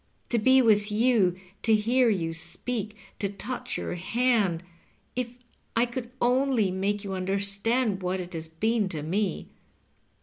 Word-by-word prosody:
To 235 - +2
be 260 +4 +5
with 210 -2 +3
you, 210 -5 +3 0.2
to 220 -2 +4
hear 240 +3 +3
you 165 -6 0
speak, 210 +6 -4 0.2
to 200 - 0
touch 250 +5 -3
your - - -3
hand 200 -2 +1 0.3
— - - -39
if 245 -1 -3 0.4
I 230 +1 +4
could 240 0 -5
only 250 -4 +2
make 200 +2 -1
you 195 -1 -4
understand 200 +3 0
what 185 +1 -1
it 180 0 -6
has 160 -1 -4
been 210 +5 0
to 155 -4 -5
me. 185 +3 -1
210 Hz, 155 wpm, -27 LUFS, 185-240 Hz, 0.4 s, be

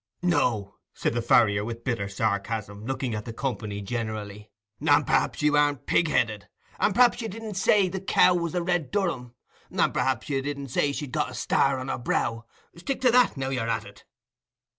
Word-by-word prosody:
"No," 115 - 0 0.2
said - - -1
the 120 - -1
farrier, 105 -3 +4
with 115 +1 -6
bitter 115 -6 -2
sarcasm, 100 +1 -2
looking 130 -1 -2
at 105 -1 -4
the 115 - -5
company 105 -5 -4
generally; 105 -1 -5 0.3
"and - - +3
p'rhaps - - +1
you 150 0 +3
aren't 145 -2 +2
pig 170 - +2
headed; 110 -8 0 0.3
and 200 - +2
p'rhaps 245 0 +4
you 225 - -3
didn't 220 +1 -7
say 195 0 +3
the 190 +1 -4
cow 185 -1 +4
was 170 -1 -2
a 175 - 0
red 175 -4 0
Durham; 165 - -2 0.3
and - - +1
p'rhaps 130 -4 0
you 135 -2 -1
didn't 140 0 -5
say 140 +3 +1
she'd 140 -2 -5
got - - -1
a - - -10
star 135 -1 +1
on 130 0 -5
her 135 - -2
brow—stick 120 - -3
to 255 -2 +4
that, 245 - +4
now 135 0 -2
you're 125 -4 -2
at - - -1
it." - - -15
130 Hz, 190 wpm, -26 LUFS, 110-170 Hz, 0.3 s, farrier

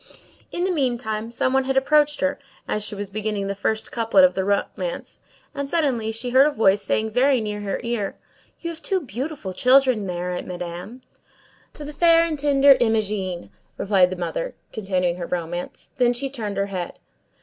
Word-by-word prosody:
In 350 - -2
the 375 - +1
meantime, 240 -7 -1
some 255 +2 0
one 265 0 +2
had 265 0 0
approached 295 +2 +3
her, 280 0 0 0.3
as 210 - -1
she 210 - -2
was 200 -1 -6
beginning 210 -1 -2
the 200 - -2
first 220 +2 -2
couplet 230 +5 +4
of 275 - +2
the 190 - -1
romance, 205 - -2 0.3
and 280 -1 -4
suddenly 260 -10 0
she 230 +3 -5
heard 265 +3 +6
a - - +1
voice 205 -7 +3
saying 220 +2 -1
very 260 +3 +3
near 210 -1 -4
her 200 -1 -3
ear:— 235 -4 -2 0.5
"You 335 - -3
have 325 -1 -11
two 380 +2 0
beautiful 260 - -5
children 255 -2 +4
there, 180 0 -3
Madame." 180 +7 -7 0.7
"To 295 - -7
the 300 - -7
fair 335 +2 +5
and 315 -3 -3
tender 280 -1 +6
Imogene—" 210 -6 -1 0.3
replied 190 -3 +3
the 185 - -4
mother, 185 - -4 0.2
continuing 185 -4 -1
her 175 - -5
romance; 175 0 -5
then 245 -2 +3
she 265 +2 -3
turned 215 -6 -4
her 200 - +1
head. 185 -3 -5
225 Hz, 185 wpm, -23 LUFS, 195-275 Hz, 0.7 s, heard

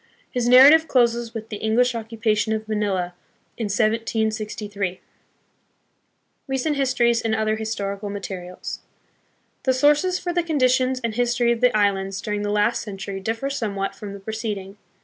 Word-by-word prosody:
His 245 -2 -1
narrative 285 +6 +8
closes 235 -2 +1
with 220 0 -6
the 210 - -5
English 235 +4 +2
occupation 220 -1 -1
of 220 0 -3
Manila 200 -5 -1 0.4
in 230 - -3
1763. 215 -2 -1 1.5
Recent 270 +3 -1
Histories 250 -4 +2
and 225 -1 0
Other 215 0 +1
Historical 205 -2 -4
Materials. 190 -3 -6 0.8
The 260 - +2
sources 295 +7 +3
for 350 -1 -3
the 350 - +2
conditions 260 -5 +2
and 230 -1 -1
history 240 0 +1
of 235 0 -1
the 250 -3 +4
islands 195 -1 0
during 210 0 -3
the 205 - -2
last 210 +3 +1
century 195 -1 -6
differ 225 +7 -3
somewhat 200 -7 -2
from 205 -2 -8
the 200 - -8
preced 220 +1 -4
ing. 195 +1 -10
220 Hz, 150 wpm, -23 LUFS, 205-245 Hz, 1.5 s, narrative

